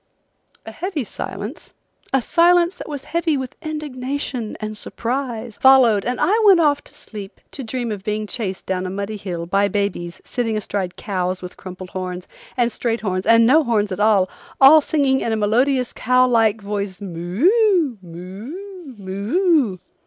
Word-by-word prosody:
A - - -7
heavy 360 -6 -3
silence, - - -7 0.4
a 270 -2 +2
silence 345 +3 +4
that 360 - -10
was 285 -3 -5
heavy 330 -1 0
with 260 -2 -5
indignation 280 -5 -4
and 215 0 -5
surprise, 235 -1 -4
followed 250 -6 +5
and 250 0 -2
I 390 - +3
went 390 -4 +7
off 295 -3 +2
to - - -14
sleep 205 -3 -10
to 275 - -7
dream 240 0 -3
of 200 -2 -5
being 210 +1 -2
chased 200 -4 -5
down 185 -1 -2
a - - -4
muddy 200 +3 -4
hill 180 -4 -5
by 195 +3 +2
babies 200 -4 -2
sitting 225 -3 -2
astride 195 -3 -3
cows 185 -2 -3
with 180 - -8
crumpled 185 0 -9
horns, 180 -1 -5 0.3
and 240 -1 +2
straight 230 -1 -2
horns 185 -3 -2
and 230 0 +6
no 300 +7 +5
horns 215 -5 0
at 185 - -4
all, 205 -3 +4 0.3
all 290 +3 +8
singing 280 -3 +1
in 230 - -1
a - - 0
melodious 250 +5 +1
cow 255 0 +3
like 225 -3 +2
voice, 200 -2 -4
moo! 260 - +1
moo! 250 - -9
moo! 215 - +1
225 Hz, 165 wpm, -21 LUFS, 195-275 Hz, 0.4 s, all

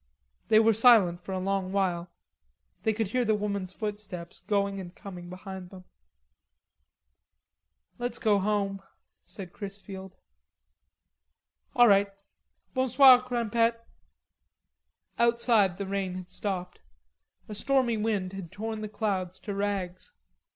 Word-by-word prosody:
They 215 - +5
were 225 +1 +5
silent 215 -6 +5
for 190 - -8
a 190 - -1
long 190 0 -1
while. 180 -3 0 0.7
They 220 - +2
could 220 -2 -2
hear 250 +3 +1
the 220 -2 +2
woman's 200 -3 -3
footsteps 205 -4 -6
going 200 -1 0
and 180 -1 -9
coming 180 -3 -9
behind 185 0 -8
them. 185 -1 -12 2.2
"Let's 245 -1 -2
go 210 -3 +3
home," 195 -1 -1 0.4
said 190 -3 -9
Chrisfield. 195 -1 -8 1.6
"All 245 -2 +7
right.... 200 -1 +5 0.6
Bonsoir, 260 0 +7
Crimpette." 235 -2 0 1.4
Outside 235 -5 +3
the 200 - -3
rain 190 -1 -2
had 185 -1 -8
stopped. 185 -3 -4 0.7
A 215 - -7
stormy 255 +2 +1
wind 210 -4 -1
had 190 -4 -7
torn 220 +2 -5
the 215 - -5
clouds 190 -4 -2
to 205 - -5
rags. 195 -3 -3
200 Hz, 120 wpm, -28 LUFS, 190-220 Hz, 2.2 s, All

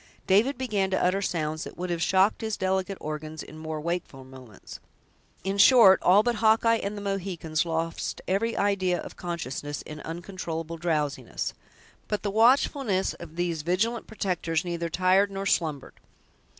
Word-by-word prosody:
David 225 +8 +3
began 210 -7 0
to 190 - 0
utter 185 +2 +1
sounds 155 -4 -2
that - - -9
would 180 0 -3
have 170 -1 -2
shocked 190 +4 +3
his 220 -1 -2
delicate 190 +1 -1
organs 155 +1 -6
in 155 - -12
more 155 -1 -4
wakeful 165 -4 -4
moments; 130 -6 -12 0.6
in 195 +1 -2
short, 210 -3 +8
all 195 +4 +5
but 240 -1 0
Hawkeye 225 +1 +4
and 205 +1 -4
the - - -5
Mohicans 180 -5 -2
lost 165 0 -2
every 215 +5 0
idea 190 -3 +1
of - - -8
consciousness, 145 -4 -5
in 150 0 -9
uncontrollable 165 -1 -5
drowsiness. 155 -4 -2 0.5
But 210 - -2
the 205 - -1
watchfulness 230 -2 +3
of 165 -2 -11
these 170 -2 -1
vigilant 200 +8 -1
protectors 180 -5 -2
neither 170 -1 -3
tired 185 +4 +3
nor 195 0 -5
slumbered. 155 -7 -1
185 Hz, 155 wpm, -27 LUFS, 160-200 Hz, 0.6 s, short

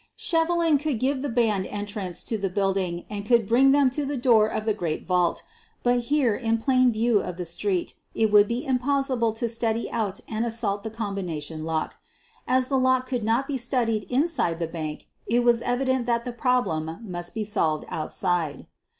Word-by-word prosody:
Shevelin 335 -6 +2
could 295 -4 -1
give 260 +3 0
the 285 - -2
band 220 -5 +1
entrance 205 -3 -4
to 225 - -2
the 200 -2 -1
build 195 0 0
ing 175 -2 -3
and 205 -1 -5
could 230 -1 +3
bring 255 +5 +5
them 280 -2 +4
to 295 +3 -2
the 280 0 -2
door 235 -4 +4
of 215 0 -3
the 220 - +2
great 165 -5 -3
vault. 180 -2 +1 0.4
But 245 0 +3
here, 280 -4 +2
in 225 0 0
plain 255 +1 +3
view 225 -1 +2
of 180 -1 -6
the 180 - -4
street, 180 +2 -2 0.2
it 220 -1 +2
would 205 0 +6
be 240 +6 -3
impossible 260 -2 +1
to 230 +2 -2
study 230 0 -2
out 215 -5 -2
and 220 0 -2
assault 225 -3 -1
the 220 - -5
combina 200 -7 -4
tion 155 +1 -6
lock. 160 -1 -2 0.5
As 255 0 +2
the 270 -1 +1
lock 260 0 +2
could 250 -3 -3
not 230 +5 +1
be 270 -2 -3
studied 235 -3 0
inside 250 - +1
the 170 - -1
bank 160 -2 -6 0.2
it 240 +2 +2
was 240 -1 +3
evident 255 0 0
that 235 0 0
the 245 - -4
problem 225 -11 0
must 175 -1 -6
be 220 -1 -2
solved 155 -7 0
outside. 160 -2 -2
230 Hz, 195 wpm, -25 LUFS, 195-255 Hz, 0.5 s, would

